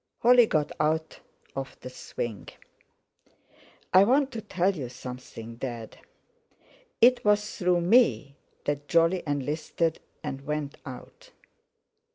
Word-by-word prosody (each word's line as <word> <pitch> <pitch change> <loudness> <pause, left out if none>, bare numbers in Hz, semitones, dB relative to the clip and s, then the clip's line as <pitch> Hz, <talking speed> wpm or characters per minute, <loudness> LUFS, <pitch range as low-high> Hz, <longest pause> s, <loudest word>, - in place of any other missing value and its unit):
Holly 245 -1 +7
got 150 -5 0
out 160 +1 0 0.4
of 135 0 -6
the 125 - -7
swing. 115 -4 -6 1.4
"I 185 - +8
want 265 +5 +3
to 230 - -5
tell 195 -2 0
you 130 -7 -5
something, 125 -2 -9
Dad. 120 -3 -6 1.0
It 245 +1 +6
was 210 0 +2
through 180 -1 +2
me 160 - +3 0.3
that 145 0 -2
Jolly 170 +2 +3
enlisted 150 +3 -1 0.2
and 135 - -4
went 150 0 -4
out." 125 -2 -11
155 Hz, 115 wpm, -27 LUFS, 135-195 Hz, 1.4 s, I